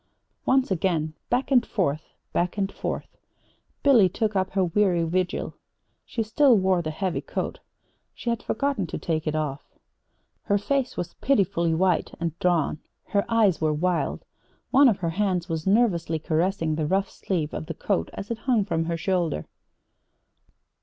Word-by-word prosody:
Once 260 -3 +3
again, 165 -4 0 0.2
back 250 +3 0
and 250 -3 +5
forth, 155 -7 -2 0.2
back 175 +3 0
and 195 -1 0
forth, - - -5 0.7
Billy 240 -10 +6
took 215 +3 -1
up 190 -1 +1
her 190 -1 +2
weary 180 -1 +2
vigil. 180 +2 -1 0.5
She 225 - -2
still 245 +2 +4
wore 190 -2 +2
the 155 - -3
heavy 165 +3 -2
coat. - - -4 0.6
She 235 - -2
had 235 -1 -2
forgotten 270 -6 -1
to - - -4
take 160 -1 -2
it 155 - 0
off. 150 -2 -2 0.8
Her 205 - +1
face 265 +4 -1
was 175 -1 -4
pitifully 175 -10 +2
white 180 0 +1
and 170 -2 -2
drawn. 170 -4 +1 0.3
Her 200 -1 +1
eyes 215 -7 +3
were 155 -1 +2
wild. 175 +3 -1 0.5
One 275 0 +7
of 210 - +1
her 170 -4 -2
hands 185 -1 0
was 160 0 -3
nervously 190 -7 +2
caressing 165 +1 0
the 155 -1 -1
rough 195 +3 0
sleeve 165 -6 -2
of 155 - -5
the 165 - -5
coat 85 - -1
as 205 - -6
it 230 - -3
hung 230 -4 +1
from 165 -5 -1
her 170 0 -2
shoulder. 170 - -1
185 Hz, 165 wpm, -25 LUFS, 165-210 Hz, 0.8 s, One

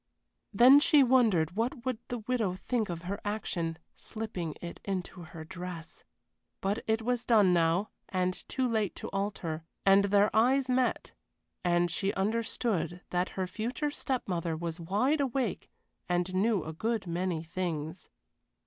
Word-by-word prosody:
Then 250 +7 +8
she 290 -1 +6
wondered 225 - +3
what 235 +2 -2
would 255 -4 -1
the 245 - -3
widow 220 -4 -1
think 220 +2 -2
of 170 0 -5
her 195 +3 -4
action, 175 -6 -2 0.2
slipping 185 -8 -5
it 170 -1 -7
into 185 -2 -4
her 165 -1 -9
dress 175 -1 -8 0.6
but 200 +4 -1
it 220 0 +1
was 245 0 0
done 210 -7 +5
now, 170 +4 +2 0.2
and 185 -1 0 0.2
too 260 -1 0
late 220 -5 0
to - - -6
alter. 195 -5 -3 0.2
And 195 +1 +6
their 205 +1 +3
eyes 255 +4 +4
met, 250 0 0 0.5
and 175 -1 +2
she 195 +4 0
understood 205 -4 -1
that 180 +1 0
her 190 - 0
future 240 - -3
step 265 -3 -2
mother 170 -3 -1
was 170 +1 -4
wide 215 - +1
awake 265 -1 -1 0.4
and 180 +1 0
knew 200 -1 +2
a 160 - -6
good 220 +5 -1
many 175 -1 -2
things. 165 -1 -4
195 Hz, 150 wpm, -30 LUFS, 175-230 Hz, 0.6 s, Then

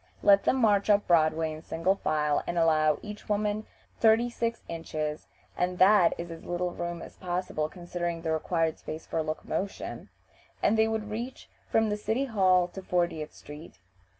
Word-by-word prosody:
Let 200 0 +6
them - - +3
march 210 -5 +3
up 205 0 +4
Broadway 160 -1 +2
in 155 - -9
single 165 +3 0
file, 150 -5 0
and 175 - -2
allow 155 -2 +3
each 210 0 -9
woman 210 +1 0 0.3
thirty 230 +2 +4
six 235 0 -2
inches 155 -2 -4 0.3
(and 180 0 -1
that 190 -2 +6
is 170 0 -6
as 165 - -9
little 175 0 -2
room 175 0 -5
as - - -12
possible, 175 -4 -2
considering 175 -1 -4
the 160 - -1
required 160 0 0
space 155 +1 -7
for 165 - -1
locomotion), 160 +5 -4 0.5
and 210 - +4
they 220 0 +4
would 220 -1 -3
reach 240 +4 -6 0.2
from 220 -1 +2
the 210 - -1
City 220 +6 -1
Hall 185 -7 +3
to 190 - -8
Fortieth 170 -4 -1
Street. 150 +3 -11
180 Hz, 170 wpm, -28 LUFS, 160-210 Hz, 0.5 s, Let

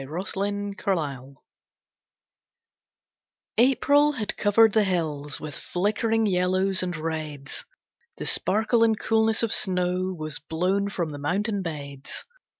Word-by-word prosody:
Azure 180 +7 -3
and 205 0 -3
Gold 140 - -3 2.2
April 285 +4 +4
had 220 -7 -3
covered 215 +1 +4
the 220 - +4
hills 155 -6 -1
With 155 -1 -7
flickering 220 +7 0
yellows 185 0 +1
and 180 -2 -2
reds, 155 -3 -5 0.5
The - - -5
sparkle 220 +3 +2
and 220 -1 +2
coolness 220 0 +2
of 230 - +2
snow 180 0 0
Was 155 -2 -3
blown 180 +7 0
from 170 -5 -3
the 145 - -7
mountain 200 +8 -1
beds. 140 -5 -7
185 Hz, 120 wpm, -25 LUFS, 155-210 Hz, 2.2 s, April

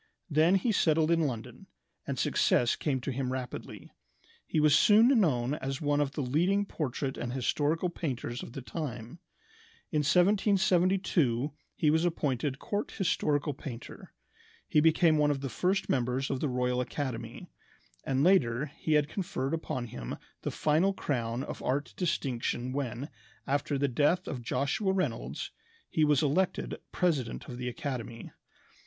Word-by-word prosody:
Then 160 +5 +4
he 225 +5 +2
settled 160 -4 +3
in 165 -2 +3
London, 115 -4 -7 0.4
and - - -2
success 120 -1 +2
came 140 -4 -1
to 135 - -3
him 130 0 -2
rapidly. 130 -1 -6 0.6
He 155 - +1
was 150 -1 +5
soon 210 +9 +6
known 130 - +2
as 135 -3 -3
one 145 -1 +1
of 140 -1 -1
the 150 - -2
leading 175 +10 +2
portrait 140 -6 -3
and 120 0 -3
historical 150 +6 0
painters 130 -8 -4
of - - -9
the 135 - -6
time. 125 -2 -6 0.7
In 150 - +1
1772 180 - +3 0.2
he 150 - +3
was 160 +2 +2
appointed 145 -5 -1
court 205 +5 -3
historical 150 -6 +1
painter. 125 -3 -9 0.6
He 150 - +3
became 160 0 +4
one 150 0 +4
of 140 -2 -1
the 135 - -3
first 185 - 0
members 130 +1 0
of 135 - -1
the 150 - 0
Royal 125 0 0
Academy; 130 -1 -4 0.6
and 135 0 +1
later 145 -6 +3
he 155 - 0
had 150 -1 +4
conferred 155 -6 -3
upon 130 -6 -3
him - - -6 0.2
the - - -2
final 160 +6 +2
crown 120 -7 -2
of - - -6
art 140 +3 -1
distinction 130 -7 -1
when, 130 -1 -3 0.4
after 140 +1 0
the 140 +1 +1
death 150 +8 +2
of 130 -5 -4
Joshua 140 - 0
Reynolds, 190 -1 -2 0.4
he 155 - +2
was 150 -1 +4
elected 165 +6 0 0.2
president 150 -10 -1
of 125 -2 -7
the 125 0 -2
academy. 120 -3 -5
145 Hz, 150 wpm, -30 LUFS, 125-165 Hz, 0.7 s, soon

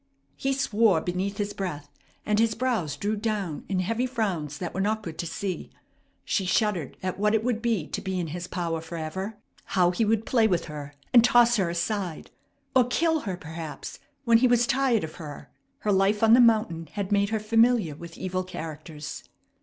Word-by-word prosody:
He 270 - -1
swore 225 -8 +3
beneath 185 +4 -2
his 205 0 -2
breath, 150 -7 -5 0.3
and 210 0 +2
his 225 -1 +2
brows 220 - -1
drew 205 +6 -1
down 205 -7 -3
in 190 -2 +1
heavy 230 +7 0
frowns 185 - -2
that 175 -2 -5
were 190 - -1
not 215 +2 0
good 165 -3 -7
to 170 - -2
see. 185 +2 -4 0.6
She 195 - 0
shuddered 185 - 0
at 185 0 -3
what 210 +1 +3
it 220 - +1
would 235 -2 0
be 225 -9 0
to - - -3
be 190 -2 -2
in 170 -3 -3
his 175 +3 -5
power 170 -3 -2
forever. 170 +6 -5 0.3
How 180 -2 +3
he 205 +6 0
would 220 0 +1
play 230 -3 +3
with 180 -5 0
her 145 -2 -8 0.2
and 235 -2 +8
toss 240 -1 +5
her 190 -4 +1
aside! 175 0 -3 0.4
Or 255 -2 +6
kill 320 +6 +1
her, 190 -9 -4
perhaps, 160 -2 -7 0.3
when 230 -1 +6
he 255 - +5
was 245 -1 +4
tired 260 -4 +2
of 155 - -7
her! 150 -4 -9 0.3
Her 210 - +1
life 200 +2 +2
on 225 0 +7
the 245 - +8
mountain 215 -8 +3
had 200 -1 -3
made 200 0 +3
her 220 0 0
familiar 225 -4 +3
with 170 +2 -10
evil 185 0 -2
characters. 155 -4 -7
200 Hz, 195 wpm, -26 LUFS, 170-225 Hz, 0.6 s, and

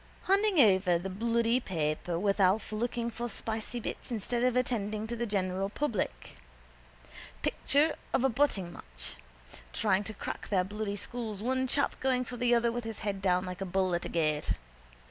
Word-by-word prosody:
Hanging 395 -1 +3
over 190 -7 +5
the 190 +3 -5
bloody 230 +4 +2
paper 165 -4 -1
with 200 +3 +1
Alf 195 +4 +3
looking 235 +2 -1
for 240 +2 -4
spicy 225 +2 -3
bits 235 - -5
instead 235 +1 -1
of 250 0 +2
attending 215 -4 0
to 235 +2 -4
the 235 0 -2
general 195 -1 0
public. 210 - -3 1.1
Picture 295 +3 +3 0.2
of 260 - +2
a 270 - +4
butting 215 -9 +1
match, - - -7 0.6
trying 200 -2 +2
to 220 - -5
crack - - -5
their 190 -3 +3
bloody 205 +1 -3
skulls, 215 -1 -5
one 260 +1 +1
chap 280 +3 +1
going 255 -1 +1
for 245 - -6
the 245 0 +3
other 235 0 +2
with 240 +1 -3
his 225 -1 -6
head 200 -2 -2
down 180 -1 +2
like 180 +1 -6
a - - +1
bull 185 0 +1
at 175 - 0
a - - -4
gate. 155 -3 +1
215 Hz, 180 wpm, -31 LUFS, 190-240 Hz, 1.1 s, over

